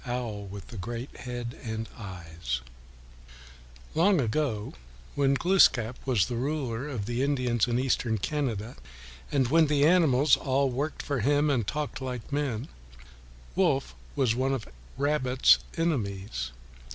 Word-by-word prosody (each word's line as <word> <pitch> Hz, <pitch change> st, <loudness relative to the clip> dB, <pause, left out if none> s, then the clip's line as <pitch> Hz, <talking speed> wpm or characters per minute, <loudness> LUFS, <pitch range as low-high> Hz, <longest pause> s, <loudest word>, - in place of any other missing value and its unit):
OWL 115 Hz, -5 st, -3 dB
WITH 100 Hz, 0 st, -9 dB
THE 115 Hz, -, -9 dB
GREAT 120 Hz, +6 st, -5 dB
HEAD 120 Hz, -1 st, -6 dB
AND 110 Hz, -1 st, -4 dB
EYES 85 Hz, -, -5 dB, 1.3 s
Long 185 Hz, +2 st, +4 dB
ago, 115 Hz, -3 st, -1 dB, 0.4 s
when 140 Hz, -1 st, +2 dB
Glooskap 130 Hz, -, +4 dB
was 120 Hz, -9 st, +3 dB
the 120 Hz, -, -3 dB
ruler 135 Hz, -2 st, -2 dB
of 115 Hz, -8 st, -3 dB
the 120 Hz, +3 st, -2 dB
Indians 125 Hz, -5 st, +1 dB
in 120 Hz, 0 st, +1 dB
Eastern 125 Hz, -3 st, +1 dB
Canada, 120 Hz, -2 st, -2 dB, 0.5 s
and 135 Hz, -4 st, +2 dB
when 160 Hz, +2 st, +5 dB
the 145 Hz, -1 st, +3 dB
animals 150 Hz, -5 st, +5 dB
all 135 Hz, 0 st, +1 dB
worked 145 Hz, +5 st, -3 dB
for 140 Hz, -3 st, -1 dB
him 145 Hz, +5 st, +3 dB
and 120 Hz, -7 st, 0 dB
talked 150 Hz, +1 st, -3 dB
like 125 Hz, 0 st, -5 dB
men, 140 Hz, -6 st, -1 dB, 0.9 s
Wolf -, -, +2 dB, 0.2 s
was 130 Hz, -5 st, +2 dB
one 130 Hz, +3 st, +1 dB
of 115 Hz, -, -6 dB, 0.3 s
Rabbit's 135 Hz, -2 st, +4 dB, 0.2 s
enemies. 100 Hz, -, -1 dB
125 Hz, 135 wpm, -28 LUFS, 110-145 Hz, 1.3 s, when